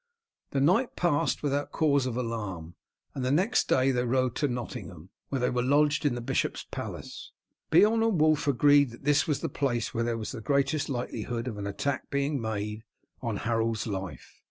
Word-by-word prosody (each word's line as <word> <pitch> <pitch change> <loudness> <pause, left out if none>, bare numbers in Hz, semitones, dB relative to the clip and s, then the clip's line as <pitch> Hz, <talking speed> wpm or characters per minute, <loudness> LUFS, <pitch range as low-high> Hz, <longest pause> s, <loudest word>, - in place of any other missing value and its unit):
The 140 - -1
night 185 - +2
passed 160 -5 +1
without 145 0 -1
cause 140 -4 +2
of 125 -1 -3
alarm, 105 -9 -4 0.4
and 130 - -4
the 130 - 0
next 185 - +2
day 130 +1 +4
they 125 -1 0
rode 130 0 +1
to 145 - +1
Nottingham, 105 - -6 0.2
where 135 - -1
they 125 - +1
were 125 0 0
lodged 145 +3 +3
in 125 - 0
the 120 - -4
bishop's 120 - -1
palace. - - -7 0.4
Beorn 210 +7 +5
and 225 -6 +2
Wulf 155 -1 +3
agreed 145 +1 +5
that 120 - -13
this 145 +1 +3
was 150 -3 0
the - - -1
place 120 -5 -1
where 115 - 0
there 115 -1 -1
was 110 - -5
the 120 - -7
greatest 140 +6 +1
likelihood 120 -1 -3
of 110 -4 -4
an 100 - -3
attack 130 +7 -2
being 140 -1 0
made 105 0 -3 0.4
on 115 -5 -2
Harold's 115 -1 0
life. 95 - -6
130 Hz, 190 wpm, -28 LUFS, 115-145 Hz, 0.4 s, Beorn